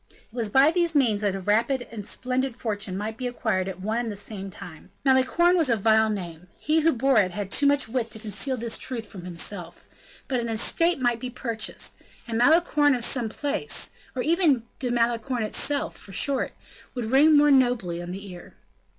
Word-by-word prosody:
It - - -25 0.2
was 230 -3 -2
by 270 +7 +5
these 340 -2 0
means 230 -7 +3
that 200 -2 0
a - - -4
rapid 230 +6 0
and 220 -3 -6
splendid 255 -1 -2
fortune 205 -5 -3
might 215 +2 -4
be 250 - -3
acquired 220 -6 -1
at 185 -1 -6
one 215 +4 -1
and 235 -2 -3
the 205 - -7
same 195 -1 -6
time. 165 -3 -12 0.2
Malicorne 270 +7 +4
was 325 -6 +2
a 230 - +4
vile 220 +1 +3
name; 180 -4 -6
he 310 +1 +1
who 325 +1 +3
bore 265 -1 +3
it 190 -3 +2
had 195 +2 -5
too 285 - +3
much 285 -2 +3
wit 230 0 -2
to 220 - -7
conceal 220 +5 -2
this 230 -1 -4
truth 240 -4 -1
from 190 -4 -10
himself; 175 0 -4 0.4
but 260 -3 0
an 235 -1 -3
estate 330 +9 +1
might 240 -2 +1
be 255 - -5
purchased; 230 -3 -4 0.3
and 230 - -3
Malicorne 295 +1 +4
of 240 -1 -1
some 240 -4 +1
place, 290 - -1 0.2
or 250 - -1
even 315 -7 +2 0.2
De 255 - -1
Malicorne 240 +1 0
itself, 285 +6 -1
for 195 - -12
short, 275 +7 0 0.4
would 245 -2 -3
ring 290 +6 +5
more 295 0 +5
nobly 245 -10 +2
on 175 - -7
the 195 +3 -7
ear. 175 -1 -12
235 Hz, 200 wpm, -25 LUFS, 205-270 Hz, 0.4 s, by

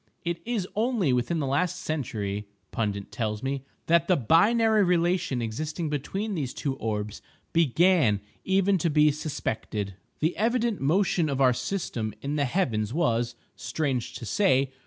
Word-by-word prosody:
It 170 0 -2
is 220 -6 -1
only 215 - +1
within 125 +7 0
the 150 - -1
last 150 +7 +1
century, 105 - -3 0.2
Pundit 100 -3 -2
tells 110 -1 -3
me, 135 0 -2 0.2
that 170 0 +3
the 185 - +4
binary 215 - +4
relation 175 -7 +1
existing 150 +8 -3
between 195 +9 -2
these 140 -8 -3
two 140 - -2
orbs 105 -2 -3 0.3
began 165 - +4 0.2
even 190 0 +2
to 170 - +1
be 150 0 +5
suspected. 110 -9 -3 0.3
The 160 +3 +1
evident 235 0 +1
motion 165 +2 +2
of 140 -1 -1
our 130 -2 +5
system 125 - -3
in 140 +2 -3
the 145 -2 +1
heavens 115 - 0
was 120 -7 +1 0.2
(strange 135 -6 -2
to 120 - -6
say!) 135 - +2
150 Hz, 150 wpm, -27 LUFS, 120-180 Hz, 0.3 s, be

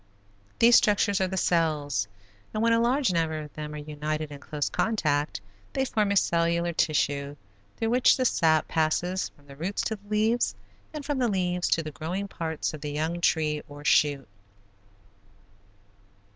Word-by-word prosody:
These 235 +1 +7
structures 205 -1 +2
are 190 - +2
the 190 +1 -4
cells, 150 - +1 0.5
and 215 - 0
when 230 0 +4
a 230 - +4
large 250 -3 +2
number 160 -2 0
of 150 -1 -8
them 150 0 -6
are - - -5
united 150 +1 -4
in 145 - -8
close 145 0 -3
contact 150 - 0 0.3
they 265 - 0
form 215 -5 0
a 200 - +1
cellular 170 -1 +1
tissue 145 -3 0 0.4
through 225 0 -1
which 250 +1 +5
the 255 - 0
sap 160 -8 +3
passes 175 +4 0
from 145 - -26
the 140 -1 -13
roots 175 +8 -2
to 220 - -2
the 205 +1 -22
leaves, 220 +3 +1 0.4
and 300 -2 -7
from 290 -2 -1
the 245 - +2
leaves 180 -3 0
to 165 - +1
the 155 - -6
growing 170 +8 -4
parts 160 -5 -3
of 155 - -8
the 150 -1 -4
young 160 +4 -2
tree, 155 -3 +1
or 145 0 -11
shoot. 140 -2 +3
165 Hz, 170 wpm, -27 LUFS, 150-205 Hz, 0.5 s, These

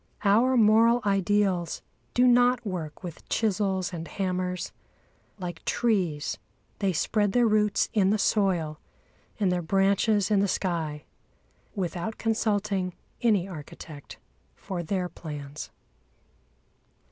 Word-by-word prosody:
Our 235 +6 +4
moral 230 +2 +5
ideals 195 -3 +1 0.3
do 250 - +5
not 245 0 +4
work 170 -6 -5
with 175 -3 -9
chisels 195 -3 0
and 165 -1 -5
hammers. 180 -1 -2 0.7
Like 175 -4 -6
trees, 185 -11 0 0.4
they 195 -2 +1
spread 205 +4 +1
their 245 -1 +4
roots 210 -1 +2
in 195 -3 +3
the 215 - +3
soil 180 -8 +1 0.6
and 195 -3 +2
their 180 0 0
branches 195 +3 +2
in 205 - +4
the 200 - +2
sky, 160 -6 -2 0.7
without 185 +2 -3
consulting 205 -4 0 0.3
any 210 -6 +3
architect 150 -3 -10 0.4
for 185 -3 -5
their 180 +2 -1
plans. 150 -4 -7
195 Hz, 110 wpm, -27 LUFS, 175-215 Hz, 0.7 s, moral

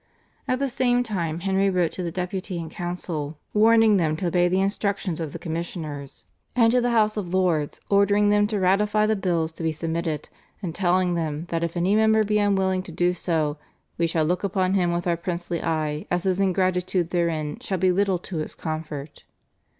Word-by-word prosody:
At 255 - +1
the 275 +1 0
same 245 -1 +1
time 170 -7 -3
Henry 195 +1 +2
wrote 180 -3 +1
to - - -5
the 170 -2 -3
Deputy 185 +1 -4
and 165 -1 -6
council 165 -4 -4 0.2
warning 220 0 +5
them 155 -3 +1
to 175 +1 -1
obey 175 +1 +3
the 185 +2 +1
instructions 195 -3 -1
of 160 -3 -4
the - - -6
commissioners, 160 -4 -6 0.3
and 230 -2 +5
to 250 +1 +3
the 245 - +1
House 215 -2 +2
of 185 -3 -3
Lords 170 -6 +1
ordering 200 +1 +3
them 205 0 +4
to 210 -1 -1
ratify 210 +3 +3
the 215 0 +2
bills 170 -5 0
to 160 - -10
be 160 -1 +1
submitted, 160 0 -3 0.3
and 180 -6 -4
telling 180 0 +2
them 160 -2 -2
that 165 0 -1
if 170 +1 -3
any 180 +3 +2
member 220 0 +4
be 210 0 +1
unwilling 190 -2 +2
to 185 - -10
do 175 +2 +1
so, 160 -4 -1 0.4
"we 170 - +3
shall 160 -1 +1
look 180 +5 0
upon 190 -1 +1
him 180 -3 +2
with 175 0 -2
our 175 -1 +2
princely 170 0 -4
eye 155 -2 -2
as 175 0 0
his 190 -1 0
ingratitude 185 -2 +1
therein 160 -4 -1
shall 190 - -2
be 185 +1 +3
little 195 0 +2
to 175 0 -7
his 155 - -4
comfort." 155 -2 -6
180 Hz, 200 wpm, -24 LUFS, 165-200 Hz, 0.4 s, warning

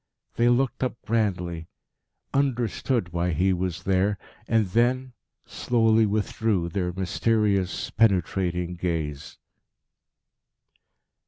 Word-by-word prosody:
They 120 +1 +3
looked 130 +2 +1
up 125 -2 -2
grandly, 90 -7 -1 0.7
understood 120 -6 0
why 85 0 0
he 95 +5 +2
was 90 -2 -3
there, 95 +2 +1 0.3
and 110 -2 +3
then 125 +6 +1 0.3
slowly 115 -2 +2
withdrew 105 -3 0
their 90 -1 -2
mysterious, 100 +1 0
penetrating 90 -4 +1
gaze. 80 -5 -3
100 Hz, 90 wpm, -25 LUFS, 90-115 Hz, 0.7 s, They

